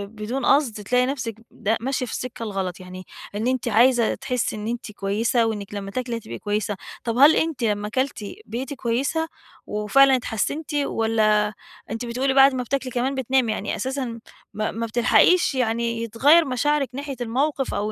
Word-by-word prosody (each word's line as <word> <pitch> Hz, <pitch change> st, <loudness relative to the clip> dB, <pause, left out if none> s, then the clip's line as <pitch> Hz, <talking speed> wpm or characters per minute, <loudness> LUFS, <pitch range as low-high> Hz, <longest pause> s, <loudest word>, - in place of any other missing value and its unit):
بدون 225 Hz, +6 st, -3 dB
قصد 275 Hz, -5 st, +3 dB
تلاقي 250 Hz, +4 st, +2 dB
نفسِك 255 Hz, -5 st, -3 dB, 0.2 s
ده 220 Hz, +2 st, -1 dB
ماشية 260 Hz, +1 st, -1 dB
في 235 Hz, -, -8 dB
السكة 250 Hz, -2 st, -5 dB
الغلط، 195 Hz, -4 st, -3 dB
يعني 185 Hz, 0 st, -10 dB, 0.3 s
إن 215 Hz, +3 st, -1 dB
أنتِ 255 Hz, -1 st, -1 dB
عايزة 235 Hz, +1 st, +4 dB
تحسي 250 Hz, -4 st, -2 dB
إن 210 Hz, 0 st, -5 dB
أنتِ 235 Hz, -2 st, -4 dB
كويسة، 215 Hz, +4 st, 0 dB
وإنِك 205 Hz, -3 st, -4 dB
لمّا 200 Hz, -1 st, -5 dB
تاكلي 240 Hz, 0 st, -3 dB
هتبقى 120 Hz, -, -8 dB
كويسة، 205 Hz, 0 st, -2 dB, 0.3 s
طب 230 Hz, 0 st, -2 dB
هل 290 Hz, +4 st, +7 dB
أنتِ 315 Hz, -6 st, -1 dB
لمّا 210 Hz, -1 st, 0 dB
كلتِ 260 Hz, -1 st, -2 dB, 0.2 s
بقيتِ 260 Hz, +5 st, -5 dB
كويسة 270 Hz, +6 st, -1 dB, 0.4 s
وفعلًا 260 Hz, +6 st, +4 dB
اتحسنتِ، 260 Hz, +6 st, -3 dB
والّا 220 Hz, -6 st, +1 dB, 0.4 s
أنتِ 225 Hz, +2 st, -3 dB
بتقولي 255 Hz, +3 st, 0 dB
بعد 270 Hz, 0 st, +7 dB
ما 250 Hz, -, -1 dB
بتاكلي 260 Hz, +1 st, -2 dB
كمان 255 Hz, +3 st, -1 dB
بتنامي، 260 Hz, -2 st, +1 dB
يعني 205 Hz, -1 st, -3 dB
أساسًا 260 Hz, -3 st, -3 dB, 0.3 s
ما 215 Hz, +1 st, -2 dB
ما 230 Hz, +1 st, -3 dB
بتلحقيش 245 Hz, +9 st, +4 dB
يعني 230 Hz, -1 st, 0 dB
يتغير 285 Hz, +9 st, +4 dB
مشاعرِك 275 Hz, +2 st, 0 dB
ناحية 280 Hz, +1 st, -5 dB
الموقف، 270 Hz, +4 st, -1 dB
أو 205 Hz, +1 st, -1 dB
240 Hz, 170 wpm, -23 LUFS, 215-265 Hz, 0.4 s, هل